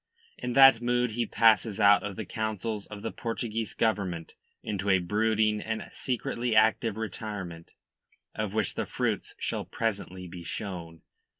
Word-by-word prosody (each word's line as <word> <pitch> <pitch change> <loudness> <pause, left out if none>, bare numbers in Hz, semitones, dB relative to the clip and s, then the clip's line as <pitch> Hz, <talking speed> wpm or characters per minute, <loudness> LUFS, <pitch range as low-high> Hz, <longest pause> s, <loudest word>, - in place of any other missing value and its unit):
In 125 0 -4
that 135 -2 +8
mood 120 0 +1
he 115 +1 -1
passes 110 -2 +3
out 100 -1 +6
of 105 -2 -5
the - - -5
councils 110 -1 -3
of 105 -1 -9
the 115 - -2
Portuguese 115 -2 -3
Government 95 -7 -1 0.3
into 100 -1 -2
a 95 - +6
brooding 105 +3 +1
and 110 0 -4
secretly 120 -2 -2
active 110 0 +3
retirement, 100 -6 -6 0.6
of 105 -1 -3
which 110 -3 +1
the - - -3
fruits - - -2
shall - - -2
presently 95 -5 -3
be 85 0 -9
shown. 85 -3 -6
110 Hz, 145 wpm, -28 LUFS, 100-115 Hz, 0.6 s, that